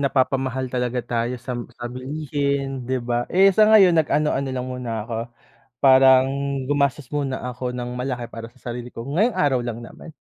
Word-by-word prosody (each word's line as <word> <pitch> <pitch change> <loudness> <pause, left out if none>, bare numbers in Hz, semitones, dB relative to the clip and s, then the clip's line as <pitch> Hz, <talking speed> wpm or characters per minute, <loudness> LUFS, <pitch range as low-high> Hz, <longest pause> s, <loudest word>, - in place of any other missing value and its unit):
napapamahal 130 -2 0
talaga 125 -1 -1
tayo 120 +1 -2
sa 125 +1 -6 0.2
sa 120 - -8
bilihin 140 -1 -3
'di 130 - +1
ba? 120 0 -1
Eh 195 +2 +5
sa 215 +2 +5
ngayon 200 -5 +7
nag 160 -2 +2
ano-ano 145 -2 +1
lang 130 -1 -3
muna 125 -2 -5
ako, 115 0 -5 0.6
parang 130 -1 +6 0.4
gumastos 140 -2 0
muna 140 -3 -1
ako 125 0 -4
ng 125 0 -5
malaki 125 -1 -3
para 115 0 -9
sa 130 - -25
sarili 120 0 -6
ko. 115 +2 -8
Ngayong 185 - +1
araw 140 -6 +3
lang 120 -1 -4
naman. 120 +7 -11
130 Hz, 175 wpm, -22 LUFS, 125-140 Hz, 0.6 s, ngayon